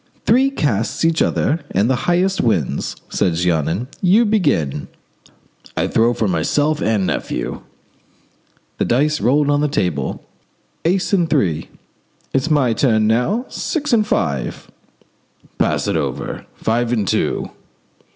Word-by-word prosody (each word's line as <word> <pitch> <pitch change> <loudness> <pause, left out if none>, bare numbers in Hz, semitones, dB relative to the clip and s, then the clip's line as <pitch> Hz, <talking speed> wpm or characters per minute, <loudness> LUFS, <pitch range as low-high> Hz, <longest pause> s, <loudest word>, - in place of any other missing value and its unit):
"Three 260 +4 +4
casts 135 - -1
each 165 -1 +2
and 145 - 0
the 130 - +2
highest 180 +8 +1
wins," 95 - 0
said 90 -5 0
Jeannin. 85 - 0
"You 200 +6 +4
begin." 145 - 0 0.9
"I - - +1
throw 115 +2 +2
for 110 - 0
myself 145 - +1
and 105 -4 +1
nephew." - - -3 1.2
The - - +2
dice 150 +5 +1
rolled 145 +3 +3
on 145 0 +2
the 150 - +2
table. 90 - -2 0.6
"Ace 185 +4 +1
and 175 -4 +2
three." 85 - 0 0.6
"It's 135 +4 +1
my 140 -6 +3
turn 110 -3 +2
now. 125 - +1
Six 295 -5 -2
and 215 -2 +3
five." 70 - -2 0.9
"Pass - - +1
it - - 0
over. - - -3
Five 115 +1 0
and 110 -5 0
two." - - -1
125 Hz, 130 wpm, -19 LUFS, 100-165 Hz, 1.2 s, Three